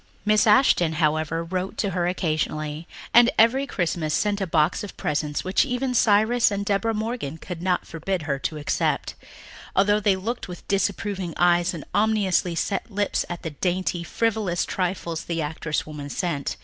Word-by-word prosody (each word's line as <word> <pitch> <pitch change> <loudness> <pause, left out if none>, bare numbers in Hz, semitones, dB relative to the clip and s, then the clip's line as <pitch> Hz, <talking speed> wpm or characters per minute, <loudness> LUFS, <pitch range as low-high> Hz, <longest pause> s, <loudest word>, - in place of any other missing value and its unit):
Miss 215 +1 +4
Ashton, 210 -7 +4
however, 155 +1 0
wrote 185 +3 -4
to 200 - 0
her 175 -1 0
occasionally, 155 -2 -2 0.3
and 240 0 +7
every 260 +5 +4
Christmas 165 - -1
sent 205 -1 0
a 190 - -1
box 165 +5 +1
of 205 - -8
presents 150 0 -2
which 185 +1 +2
even 250 +1 -1
Cyrus 225 +1 +4
and 200 -1 -3
Deborah 210 +3 0
Morgan 215 - -3
could 170 +1 -7
not 180 0 0
forbid 170 +1 -3
her 140 -3 -2
to 155 - -3
accept, 145 - -1 0.6
although 205 +2 +4
they 205 -2 +3
looked 225 +6 -4
with 180 -2 -10
disapproving 195 -2 -1
eyes 175 +1 +3
and 155 - -8
ominously 205 -5 +2
set 195 +5 -2
lips 205 -1 -1
at 175 -1 -6
the 160 - -4
dainty, 175 +2 -1
frivolous 215 -3 0
trifles 175 -3 -3
the 170 -1 -2
actress 150 0 -2
woman 150 -2 -7
sent. 145 -4 -2
180 Hz, 165 wpm, -24 LUFS, 160-205 Hz, 0.6 s, and